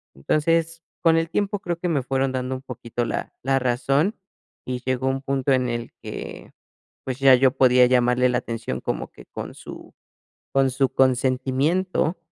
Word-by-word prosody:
Entonces, 165 - 0 0.2
con 165 -1 +4
el 165 0 0
tiempo, 205 +2 -1
creo 175 -3 -3
que 180 - -1
me 145 -5 +1
fueron 135 0 0
dando 130 0 -2
un 130 - -7
poquito 120 -2 -4
la - - -4
la 135 0 +2
razón, 135 - +1 0.5
y 125 -1 -4
llegó 130 0 0
un 135 0 0
punto 135 0 0
en 125 -1 +1
el 120 0 -4
que, - - -8 0.5
pues, 130 0 -4
ya 135 -1 +7
yo 130 +1 +5
podía 125 -1 +6
llamarle 125 0 +3
la 120 - +1
atención 115 -1 -4
como - - -3
que - - -15
con - - -7
su - - -11 0.6
con 135 -1 +3
su 135 +1 +1
consentimiento, 135 +8 +1
130 Hz, 170 wpm, -23 LUFS, 125-155 Hz, 0.6 s, ya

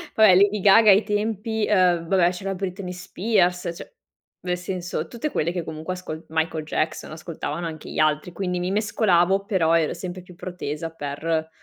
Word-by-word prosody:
Va 220 - +4
beh, 185 -4 +7
Lady 200 +2 +4
Gaga 210 +3 +7
ai 200 +3 +5
tempi. 215 +1 -1
uhm, 180 -4 +3
va 195 - +1
beh, 175 -1 +5
c'era 195 +2 -4
Britney 185 0 -5
Spears; 180 -1 0
cioè, - - -11 0.5
nel 180 -1 -2
senso, 180 -3 -4
tutte 240 - -4
quelle 165 +3 0
che 175 -1 -3
comunque 160 +3 -5
ascol 170 -3 -7
Michael 160 0 -1
Jackson, 155 +1 -2
ascoltavano 160 0 -5
anche 155 -2 -8
gli - - -4
altri, 155 +2 +1
quindi 180 0 -2
mi 180 +1 -2
mescolavo 195 -2 +2
però 180 -6 +2
ero 160 -2 0
sempre 180 +1 -6
più 180 -1 -15
protesa 165 -4 -5
per 160 +1 -3
180 Hz, 180 wpm, -24 LUFS, 165-195 Hz, 0.5 s, beh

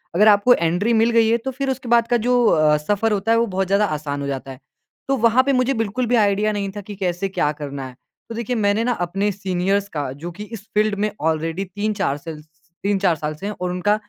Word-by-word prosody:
अगर 210 +4 +5
आपको 210 +4 +6
एंट्री 180 +5 +1
मिल 225 +1 +4
गई 230 -1 +4
है 230 - +3
तो 255 +3 -5
फिर 270 +1 -3
उसके 260 -2 -4
बाद 235 -1 +4
का 240 - +2
जो 245 +1 +2
अ, 155 -1 +4
सफ़र 205 +8 0
होता 205 +2 0
है 230 - +4
वो 230 - +3
बहुत 190 -1 -1
ज़्यादा 200 +2 +3
आसान 150 -4 -3
हो 140 - -3
जाता 135 -1 -5
है। 130 - -11 0.5
तो 270 - +2
वहाँ 235 +2 +4
पे 275 +1 +1
मुझे 255 +1 +2
बिल्कुल 225 +2 -1
भी 245 - +2
आइडिया 210 -1 +2
नहीं 200 -1 -2
था 205 - -5
कि 205 +1 -9
कैसे 185 0 -2
क्या 150 -6 0
करना 140 -2 -6
है? 125 - -13 0.3
तो 230 - -6
देखिए 235 +2 -2
मैंने 210 0 +1
ना 245 - +1
अपने 195 +4 -1
सीनियर्स 195 +1 -1
का 145 -4 -3
जो 155 +6 -7
कि 200 +5 -8
इस 210 -1 -9
फ़ील्ड 210 0 +2
में 210 +1 0
ऑलरेडी 160 +4 -1
3-4 200 -5 -2
सेल 155 0 -8
स - - -22 0.4
3-4 195 -3 +2
साल 150 0 -4
से 175 - -9
हैं 210 - -2
और 180 - -1
उनका 180 +4 +1
200 Hz, 250 wpm, -21 LUFS, 170-225 Hz, 0.5 s, आपको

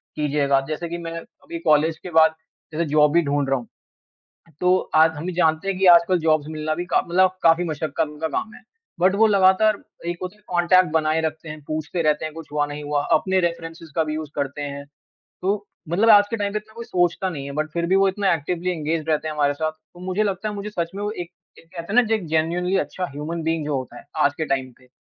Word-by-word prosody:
कीजिएगा। 140 -2 +1
जैसे 165 +2 -4
कि 170 - -4
मैं 165 -1 -6
अभी 170 - -10
कॉलेज 155 0 +2
के 180 - -6
बाद 160 0 +5 0.4
जैसे 165 +2 0
जॉब 150 -1 +5
भी 170 - +5
ढूँढ 140 -1 0
रहा 135 - +2
हूँ 120 - -11 0.9
तो 180 - +3 0.3
आज 160 +1 +6
हम 165 +5 -4
जानते 160 0 +1
हैं 195 - -2
कि 195 - +2
आजकल 175 +1 +5
जॉब्स 155 -2 +1
मिलना 155 0 -2
भी 175 - -3
का - - +2
मतलब 185 +2 +3
काफ़ी 165 +1 +5
मशक्कत 155 -1 -3
का 160 - +1
काम 215 +6 -3
है। - - -14 0.4
बट 185 +2 +3
वो 220 +2 +5
लगातार 200 +1 +4 0.3
एक 175 0 -2
होता 185 +2 -6
है - - -27
कॉन्टैक्ट 180 +1 +3
बनाए 155 0 +1
रखते 160 0 -4
हैं 155 0 -8
पूछते 155 +3 -3
रहते 155 -1 +1
हैं 155 - -6
कुछ 165 -1 -10
हुआ, 150 0 +1
नहीं 145 0 -7
हुआ 145 0 -1
अपने 190 0 +2
रेफेरेंसेज़ 165 -1 -4
का 160 - +2
भी 155 0 -3
यूज़ 155 -1 -5
करते 140 0 -3
हैं। 140 0 -5 0.6
तो 200 +2 -1 0.2
मतलब 210 +7 +3
आज 205 0 +7
के 230 - -1
टाइम 205 -2 -2
पे - - -3
इतना 215 +1 -19
कोई 235 0 -7
सोचता 175 -1 0
नहीं 145 -5 -6
है 140 - -6
बट 155 0 -3
फ़िर 170 0 0
भी 190 +2 +3
वो 195 0 +4
इतना 195 0 +1
एक्टिवली 175 +3 -2
एन्गेज्ड 160 -1 -2
रहते 155 0 0
हैं 155 - -4
हमारे 145 -1 +1
साथ। 155 +2 -2
तो 155 +2 -20
मुझे 185 +3 0
लगता 200 +1 -2
है 210 - -4
मुझे 205 +1 -5
सच 170 -4 -3
में 200 - -5
वो 210 - -1
एक 175 -5 -6 0.3
एक 165 - -19
कहते 170 +3 -6
ना 250 - +7
ज 225 - -5
एक 215 -6 0
जेनुइनली 170 +4 0
अच्छा 185 - -3
ह्यूमन 155 +4 -5
बीइंग 160 -1 -1
जो 150 -2 -1
होता 130 -2 -6
है - - -14 0.2
आज 145 - +2
के 160 - 0
टाइम 130 -2 -1
पे। 130 -1 -23
165 Hz, 245 wpm, -22 LUFS, 155-185 Hz, 0.9 s, आज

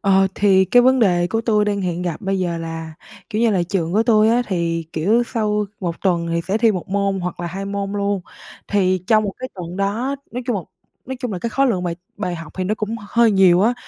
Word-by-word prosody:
Ờ, 195 -2 +4
thì 190 -2 +4
cái 245 +6 +5
vấn 260 +1 +4
đề 175 -6 +3
của 225 +4 -1
tui 215 -2 +2
đang 205 -1 -1
hiện 180 -2 -2
gặp 175 0 -3
bây 195 -2 -1
giờ 175 -2 -1
là, 165 -1 -6 0.4
kiểu 220 +1 0
như 230 - +4
là, 185 -4 +1
trường 175 -4 -1
của 215 - +3
tui 220 -2 +4
á, 240 +2 +3
thì, 165 -3 -1
kiểu, 210 +10 +2
sau 210 -3 -1
1 170 -2 -3
tuần 175 -3 +1
thì 170 - +1
sẽ 200 +3 +1
thi 225 -2 +4
1 180 -2 -5
môn 195 -1 0
hoặc 180 -1 -4
là 175 - -3
2 190 +4 -5
môn 200 0 -3
luôn. 200 -1 -1 0.5
Thì 185 -2 +2
trong 215 -1 +4
một 200 - -2
cái 255 - -5
tuần 175 -2 -7
đó, 220 +8 -1
nói 250 +2 -4
chung 245 - 0
một 185 -6 -4 0.4
nói 260 +1 -4
chung 250 -5 -3
là 185 - -3
cái 230 +6 -3
khối 275 +6 +2
lượng 200 -8 0
bài 170 -1 -2 0.2
bài 180 -4 -3
học 165 -2 -9
thì 185 - -1
nó 205 +4 0
cũng 220 +1 -3
hơi 235 0 +4
nhiều 190 -2 +5
á. 235 +4 +3
195 Hz, 255 wpm, -20 LUFS, 180-220 Hz, 0.5 s, cái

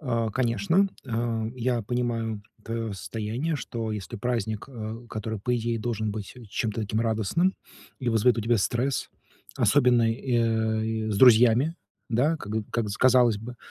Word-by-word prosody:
А 115 -6 -1
конечно, 165 - +2 0.2
э, 115 -2 -2
я 120 -1 0
понимаю 115 -2 -2 0.2
твоё 115 -1 -3
состояние, 110 - -3
что 115 -4 -4
если 105 -2 -5
праздник, 110 -2 -2
э, 115 -1 -7
который, 110 -1 -4
по 125 +4 0
идее, 115 0 -1
должен 110 -2 -2
быть 105 +2 -6 0.2
чем-то 110 0 -2
таким 105 +1 -1
радостным 115 - +1 0.4
и 125 - -2
вызовет 115 +1 +3
у - - +1
тебя 115 +2 +2
стресс, 125 +6 0 0.5
особенно 120 -4 +4
и, 125 +3 -3
э, 110 -1 +1 0.2
и - - -2
с 100 - -1
друзьями, 125 +5 +6 0.3
да, 130 +8 +2
как 105 -8 -7 0.2
как 115 -3 0
с 100 - -4
казалось 125 -3 +5
бы. 120 +3 -8
115 Hz, 160 wpm, -26 LUFS, 110-125 Hz, 0.5 s, друзьями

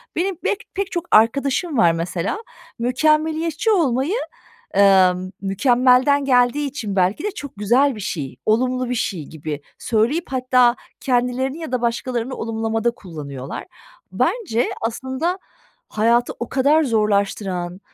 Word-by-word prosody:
benim 365 0 -1
bek 410 - -1
pek 395 0 -3
çok 345 -1 -3
arkadaşım 275 +7 +3
var 170 -7 +5
mesela, 170 - -2 0.4
mükemmeliyetçi 310 - +1
olmayı, 300 - +1 0.6
emm, 185 -2 +4
mükemmelden 250 +7 +3
geldiği 250 +2 +3
için 220 -8 -5
belki 190 - +1
de 420 - 0
çok 285 - -9
güzel 250 +7 +3
bir 215 - -8
şey, 140 -9 -4
olumlu 250 +3 +1
bir - - 0
şey 185 -9 -2
gibi 155 -1 -6 0.2
söyleyip, 240 +9 +1
hatta 255 -2 +3 0.2
kendilerini 255 +3 0
ya 320 -6 -7
da 255 - 0
başkalarını 240 +1 -2
olumlamada 225 +1 -1
kullanıyorlar. 145 - -8 0.5
Bence 330 - 0
aslında 260 +10 -2 0.5
hayatı 235 +3 +2
o 240 - -4
kadar 285 +4 +3
zorlaştıran, 200 -5 -1
245 Hz, 125 wpm, -21 LUFS, 205-280 Hz, 0.6 s, var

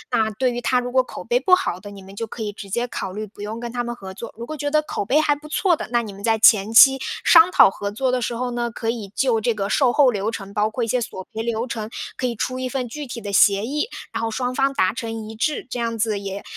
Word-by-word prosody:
那 220 -1 +2
对 245 +4 0
于 240 - -3
它 250 +1 +1
如 245 0 -3
果 260 0 +4
口 - - -9
碑 - - +1
不 365 -5 +5
好 180 - -3
的， 205 +1 -10
你 200 -1 -11
们 195 +1 -13
就 230 - -4
可 220 +1 -6
以 205 - -4
直 200 -1 -10
接 240 +5 -1
考 195 - -5
虑 210 +3 -5
不 205 0 -13
用 215 +2 -5
跟 235 0 -6
它 245 0 -1
们 240 0 -4
合 190 -4 -9
作。 230 +4 -8
如 235 - -6
果 310 - -6
觉 290 0 -2
得 305 +1 +3
口 300 - -4
碑 275 +9 +3
还 300 -1 +2
不 295 +1 -12
错 345 +4 +2
的， - - -6
那 240 -1 +2
你 215 -3 -7
们 195 +1 -12
在 225 +1 +2
前 215 -1 +5
期 270 +3 +8 0.2
商 335 +1 +7
讨 - - +7
合 200 +1 -4
作 250 +5 -1
的 250 -1 0
时 235 - -2
候 250 +1 -2
呢， 240 0 -2
可 225 0 -5
以 225 -3 -3
就 245 -4 +2
这 235 +2 +1
个 200 -2 -3
售 250 +3 +3
后 270 -3 +4
流 205 +1 -1
程， 200 -3 -8
包 210 +1 +1
括 235 +2 -2
一 - - -4
些 245 +3 0
索 190 -5 -6
赔 225 - -3
流 230 0 -2
程， 220 -3 -5 0.3
可 - - -5
以 235 - -4
出 255 +4 -3
一 255 - -2
份 255 -1 -3
具 295 +5 -6
体 240 -2 -7
的 205 -2 -6
协 200 +1 +4
议， 300 - -2 0.2
然 225 0 -3
后 225 - -1
双 250 +2 -2
方 275 +1 +1
达 185 -6 +2
成 225 -3 -5
一 220 - -8
致。 285 +6 -2
这 250 - -4
样 230 -1 -2
子 215 -1 0
也 200 0 -6
230 Hz, 325 characters per minute, -22 LUFS, 210-255 Hz, 0.3 s, 期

